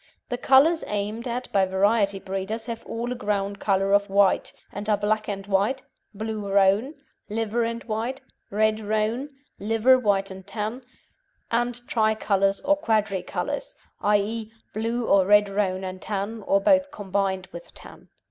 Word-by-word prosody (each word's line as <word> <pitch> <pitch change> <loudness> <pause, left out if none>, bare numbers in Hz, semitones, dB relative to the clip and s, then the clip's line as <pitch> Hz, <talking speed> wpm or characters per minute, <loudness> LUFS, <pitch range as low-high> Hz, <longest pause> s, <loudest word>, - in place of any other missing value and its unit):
The 245 - -2
colours 300 +7 +5
aimed 210 +4 -3
at 245 +1 -4
by 195 -1 +3
variety 200 +1 +2
breeders 195 +4 -4
have 230 -2 -6
all 235 +2 -3
a - - -2
ground 200 -2 -2
colour 195 -1 +1
of 200 0 +3
white, 195 -1 +3 0.2
and 205 +2 -4
are 210 - +3
black 215 +1 0
and 195 -1 -4
white, 200 +7 +1 0.3
blue 215 -1 -4
roan, 200 +9 +3 0.3
liver 225 +2 -1
and 230 +1 -3
white, 230 +4 -3 0.3
red 215 +1 +2
roan, 220 +6 -1 0.3
liver 225 +5 +4
white 195 -4 +1
and 190 0 -10
tan, 215 +4 -4 0.7
and 240 +1 +1
tricolours 210 -3 +1
or 295 - +2
quadri 215 - 0
colours - - -4 0.3
i.e., 210 +2 0 0.2
blue 230 +2 -1
or 195 -3 +4
red 205 0 +6
roan 195 -2 -1
and 185 0 -6
tan, 210 +2 -3
or 195 - +4
both 280 +6 +3
combined, 195 -6 -2
with 170 0 -10
tan. - - -14
210 Hz, 155 wpm, -25 LUFS, 195-230 Hz, 0.7 s, red